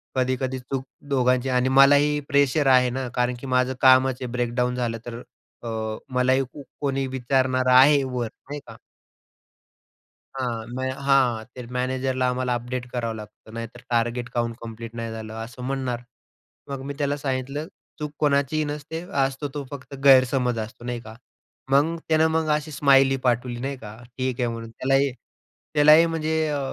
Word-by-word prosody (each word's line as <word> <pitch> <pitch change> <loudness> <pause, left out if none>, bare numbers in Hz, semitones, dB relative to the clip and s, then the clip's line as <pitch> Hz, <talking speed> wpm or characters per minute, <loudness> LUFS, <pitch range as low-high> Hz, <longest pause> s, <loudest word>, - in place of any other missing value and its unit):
कधी-कधी 130 0 0
चूक 130 +1 -4 0.2
दोघांची 130 -1 +2
आणि 125 0 +2
मलाही 145 +2 +6
प्रेशर 140 0 +3
आहे 125 0 +4
ना 130 +1 -3
कारण 125 0 +1
की 135 - -8
माझं 125 0 +2
कामच 130 0 +5
आहे 125 - -3
ब्रेकडाउन 125 0 0
झालं 120 -2 -2
तर 120 0 -6 0.4
अ, - - -6 0.5
मलाही 130 +1 +3 0.4
कोणी 135 -1 0
विचारणार 130 0 0
आहे 140 +2 +6
वर. 125 -3 -2 0.2
नाही 145 0 -4
का. - - -11 1.6
हां. 120 -4 -3
म - - -4 0.3
हां, 130 -5 +3
ते 125 -1 -7
मॅनेजरला 130 0 0
आम्हाला 125 0 -1
अपडेट 125 +1 -4
करावं 115 -2 -2
लागतं, 110 0 -12
नाहीतर 115 +1 -7
टार्गेट 120 +1 0
काऊन 120 -1 -1
कंप्लीट 115 0 -8
नाही 115 -1 -4
झालं, 110 -1 -7
असं 120 +2 -10
म्हणणार. 130 -3 -2 0.7
मग 135 -1 -4
मी - - -3
त्याला 145 -1 0
सांगितलं," 140 +2 -3 0.3
चूक 150 -1 -4
कोणाचीही 145 +1 +2
नसते, 150 +2 -5 0.2
असतो 135 +2 -2
तो 145 - -4
फक्त 140 -1 -9
गैरसमज 130 -3 +5
असतो," 110 +2 -7
नाही 120 -1 -3
का. 110 -1 -11 0.6
मग 150 +5 +3
त्यानं 160 0 +4
मग 160 -1 +1
अशी 150 +1 -4
स्माइली 135 -1 +4
पाठवली 120 0 0
नाही 135 +2 -3
का, 105 -3 -10 0.2
"ठीक 130 -1 -2
आहे," 125 - +1
म्हणून. 115 0 -7
त्यालाही 135 +3 +1 0.6
त्यालाही 150 +2 +7
म्हणजे 160 -1 -1 0.2
अ, 145 -1 -1
130 Hz, 155 wpm, -24 LUFS, 120-140 Hz, 1.6 s, त्यालाही